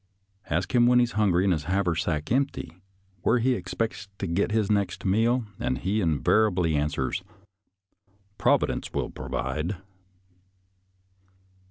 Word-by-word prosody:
Ask 85 Hz, -, -1 dB
him 120 Hz, -1 st, +5 dB
when 125 Hz, 0 st, +5 dB
he 125 Hz, -, +6 dB
is 120 Hz, -, -2 dB
hungry 95 Hz, -4 st, +2 dB
and 95 Hz, -2 st, +3 dB
his 75 Hz, -3 st, -3 dB
haversack 85 Hz, -4 st, -1 dB
empty, 135 Hz, -8 st, -1 dB, 0.5 s
where 120 Hz, -, +3 dB
he 125 Hz, +2 st, +2 dB
expects 95 Hz, 0 st, -3 dB
to -, -, -3 dB
get 90 Hz, +6 st, 0 dB
his 110 Hz, -2 st, +1 dB
next 100 Hz, -3 st, -1 dB
meal, 115 Hz, +5 st, +2 dB
and 65 Hz, -, -1 dB
he 100 Hz, -, -1 dB
invariably 90 Hz, +1 st, +2 dB
answers, 75 Hz, +5 st, -1 dB, 0.6 s
" 100 Hz, +1 st, -40 dB
Providence -, -, +1 dB
will -, -, -2 dB
provide." 85 Hz, +6 st, -3 dB
100 Hz, 135 wpm, -26 LUFS, 85-110 Hz, 0.6 s, he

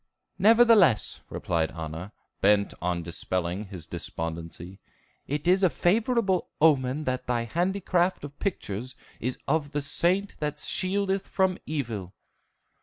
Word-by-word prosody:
"Nevertheless," 220 Hz, -, +5 dB
replied 80 Hz, -2 st, -1 dB
Anna, 80 Hz, +3 st, -6 dB, 0.3 s
bent 100 Hz, 0 st, +3 dB
on 90 Hz, -1 st, -1 dB
dispelling 90 Hz, +3 st, -3 dB
his 95 Hz, -5 st, -9 dB
despondency, 85 Hz, +2 st, -5 dB, 0.5 s
"it 150 Hz, +3 st, -2 dB
is 185 Hz, +2 st, +5 dB
a 185 Hz, -, +5 dB
favorable 205 Hz, +1 st, +1 dB
omen 145 Hz, -2 st, +3 dB
that 130 Hz, -2 st, -2 dB
thy 120 Hz, -1 st, 0 dB
handicraft 180 Hz, -, 0 dB
of 145 Hz, 0 st, -9 dB
pictures 125 Hz, -, -3 dB, 0.2 s
is 125 Hz, +2 st, -2 dB
of 145 Hz, 0 st, 0 dB
the 145 Hz, -, 0 dB
saint 185 Hz, +7 st, +1 dB
that 150 Hz, -1 st, -2 dB
shieldeth 195 Hz, +2 st, -1 dB
from 190 Hz, -1 st, +1 dB
evil." 115 Hz, -, -4 dB
140 Hz, 120 wpm, -27 LUFS, -, 0.5 s, Nevertheless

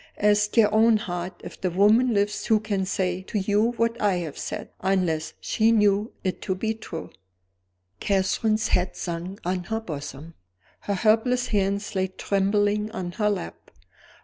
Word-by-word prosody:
Ask 210 Hz, +1 st, +2 dB
your 210 Hz, -2 st, +5 dB
own 220 Hz, +1 st, +5 dB
heart 180 Hz, -3 st, -5 dB
if -, -, -10 dB
the 185 Hz, -, +1 dB
woman 210 Hz, +7 st, +4 dB
lives 205 Hz, -1 st, 0 dB
who 220 Hz, -2 st, +4 dB
can 205 Hz, -3 st, -2 dB
say 185 Hz, -1 st, -1 dB
to 190 Hz, -, -4 dB
you 210 Hz, +4 st, +2 dB
what 230 Hz, 0 st, -1 dB
I 205 Hz, -3 st, +3 dB
have 165 Hz, -5 st, -4 dB
said -, -, -6 dB
unless 180 Hz, -5 st, 0 dB
she 220 Hz, +1 st, +2 dB
knew 210 Hz, -1 st, +3 dB
it 185 Hz, -1 st, -2 dB
to 190 Hz, -, -1 dB
be 220 Hz, +4 st, -1 dB
true." 215 Hz, -7 st, -8 dB, 0.9 s
Catherine's 215 Hz, +2 st, +1 dB
head 180 Hz, +1 st, +1 dB
sank 175 Hz, +3 st, -5 dB
on 180 Hz, 0 st, -1 dB
her 220 Hz, +3 st, -2 dB
bosom; 155 Hz, -4 st, -7 dB, 0.5 s
her 200 Hz, -, -2 dB
helpless 230 Hz, +5 st, +2 dB
hands 200 Hz, 0 st, 0 dB
lay 190 Hz, -1 st, 0 dB
trembling 205 Hz, +2 st, 0 dB
on 185 Hz, -5 st, -4 dB
her 210 Hz, +3 st, 0 dB
lap. 195 Hz, -, -5 dB
200 Hz, 160 wpm, -25 LUFS, 185-215 Hz, 0.9 s, your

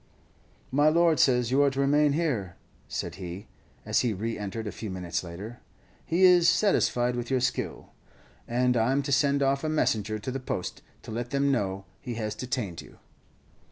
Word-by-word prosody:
"My 145 Hz, +3 st, +4 dB
lord 165 Hz, 0 st, +3 dB
says 125 Hz, -2 st, +3 dB
you 135 Hz, +2 st, +4 dB
are 140 Hz, -, +5 dB
to 135 Hz, 0 st, -5 dB
remain 145 Hz, +1 st, +3 dB
here," 125 Hz, -, -1 dB, 0.3 s
said -, -, -4 dB
he, 90 Hz, +3 st, -6 dB, 0.4 s
as -, -, +2 dB
he 120 Hz, -3 st, +1 dB
re 115 Hz, +4 st, -3 dB
entered 105 Hz, +2 st, -5 dB
a 105 Hz, -, -3 dB
few 110 Hz, -, -7 dB
minutes 90 Hz, -2 st, -3 dB
later; 100 Hz, +8 st, -8 dB, 0.4 s
"he 175 Hz, +3 st, +1 dB
is 180 Hz, -2 st, +7 dB
satisfied 125 Hz, -, +2 dB
with 120 Hz, -1 st, -4 dB
your 130 Hz, -1 st, +2 dB
skill, 125 Hz, +1 st, -3 dB, 0.6 s
and 125 Hz, +1 st, +1 dB
I'm 130 Hz, +5 st, +2 dB
to 140 Hz, -, -4 dB
send 140 Hz, +1 st, +3 dB
off 135 Hz, +1 st, +1 dB
a 155 Hz, -, 0 dB
messenger 110 Hz, -8 st, 0 dB
to 110 Hz, +5 st, -5 dB
the 135 Hz, -, -3 dB
post, 95 Hz, -8 st, -4 dB, 0.2 s
to -, -, -8 dB
let 120 Hz, +2 st, -4 dB
them 140 Hz, +1 st, +1 dB
know 100 Hz, -6 st, -1 dB
he 125 Hz, -5 st, -6 dB
has 110 Hz, -2 st, -3 dB
detained 110 Hz, -6 st, -4 dB
you." -, -, -16 dB
125 Hz, 185 wpm, -27 LUFS, 110-140 Hz, 0.6 s, is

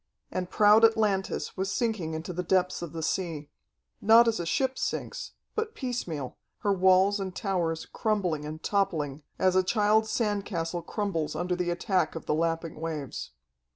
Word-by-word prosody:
And 180 Hz, -1 st, -3 dB
proud 210 Hz, +2 st, +5 dB
Atlantis 215 Hz, -4 st, +2 dB
was 190 Hz, +1 st, -2 dB
sinking 215 Hz, -10 st, -1 dB
into 165 Hz, +3 st, -5 dB
the 180 Hz, -, -2 dB
depths 180 Hz, +1 st, +1 dB
of 170 Hz, -3 st, -5 dB
the 165 Hz, -1 st, -5 dB
sea.... 160 Hz, -4 st, -2 dB, 0.5 s
Not 225 Hz, +3 st, +7 dB
as 225 Hz, -4 st, +1 dB
a 170 Hz, -, -3 dB
ship 265 Hz, +7 st, 0 dB
sinks, -, -, -3 dB, 0.2 s
but 445 Hz, 0 st, -3 dB
piecemeal, 175 Hz, -, -4 dB, 0.2 s
her 205 Hz, -, +2 dB
walls 190 Hz, +2 st, +4 dB
and 190 Hz, -1 st, -4 dB
towers 175 Hz, -6 st, -1 dB
crumbling 185 Hz, -9 st, -1 dB
and 155 Hz, +1 st, -7 dB
toppling 160 Hz, -8 st, 0 dB, 0.2 s
as 185 Hz, -1 st, +2 dB
a 185 Hz, -, +6 dB
child's 215 Hz, +3 st, +2 dB
sand 210 Hz, -4 st, 0 dB
castle 170 Hz, -3 st, -3 dB
crumbles 170 Hz, -4 st, -2 dB
under 180 Hz, +1 st, -1 dB
the 180 Hz, -1 st, -1 dB
attack 175 Hz, -1 st, 0 dB
of 165 Hz, -, -6 dB
the -, -, 0 dB
lapping 165 Hz, 0 st, -1 dB
waves. 155 Hz, -5 st, -4 dB
185 Hz, 165 wpm, -28 LUFS, 165-210 Hz, 0.5 s, Not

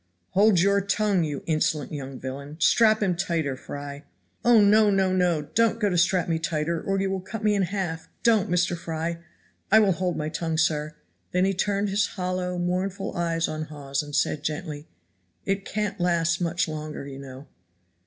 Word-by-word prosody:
"Hold 205 Hz, -1 st, +4 dB
your 200 Hz, +2 st, +3 dB
tongue, 200 Hz, -2 st, +1 dB
you 150 Hz, -3 st, -4 dB
insolent 155 Hz, -2 st, 0 dB
young 135 Hz, -2 st, -6 dB
villain. 140 Hz, +4 st, -7 dB
Strap 215 Hz, +5 st, +4 dB
him 185 Hz, -3 st, +1 dB
tighter, 165 Hz, -6 st, -1 dB
Fry." 145 Hz, +1 st, -8 dB, 0.4 s
"Oh 240 Hz, -2 st, +6 dB
no! 210 Hz, +1 st, +5 dB
no! 190 Hz, -2 st, +2 dB
no! 175 Hz, -4 st, +2 dB
don't 230 Hz, +9 st, +1 dB
go 205 Hz, -3 st, +1 dB
to 175 Hz, -, +1 dB
strap 175 Hz, +1 st, +2 dB
me 165 Hz, -1 st, 0 dB
tighter 160 Hz, +1 st, -1 dB
or 195 Hz, 0 st, -1 dB
you 195 Hz, 0 st, 0 dB
will 195 Hz, -, -1 dB
cut 215 Hz, +4 st, -7 dB
me 210 Hz, -1 st, +3 dB
in 200 Hz, -, +1 dB
half 180 Hz, -4 st, -3 dB
don't, 225 Hz, -5 st, +3 dB
Mr. 175 Hz, 0 st, +1 dB
Fry. 165 Hz, 0 st, -4 dB, 0.5 s
I 215 Hz, -, +8 dB
will 210 Hz, -3 st, +5 dB
hold 180 Hz, 0 st, -1 dB
my 155 Hz, -1 st, -2 dB
tongue, 165 Hz, 0 st, -2 dB
sir." 155 Hz, -1 st, 0 dB, 0.4 s
Then 180 Hz, +1 st, +3 dB
he 195 Hz, -, +1 dB
turned 200 Hz, +1 st, 0 dB
his 200 Hz, +1 st, +1 dB
hollow, 180 Hz, 0 st, -2 dB
mournful 185 Hz, +2 st, -2 dB
eyes 165 Hz, -1 st, 0 dB
on 155 Hz, 0 st, -4 dB
Hawes 140 Hz, -3 st, -3 dB
and 145 Hz, -1 st, -7 dB
said 150 Hz, -, +1 dB
gently, 155 Hz, -1 st, -4 dB, 0.6 s
"It 195 Hz, 0 st, -1 dB
can't 210 Hz, -3 st, -3 dB
last 170 Hz, -1 st, +1 dB
much 170 Hz, 0 st, 0 dB
longer, 155 Hz, -2 st, -6 dB
you 135 Hz, -1 st, -8 dB
know." 135 Hz, 0 st, -10 dB
175 Hz, 185 wpm, -25 LUFS, 155-195 Hz, 0.6 s, I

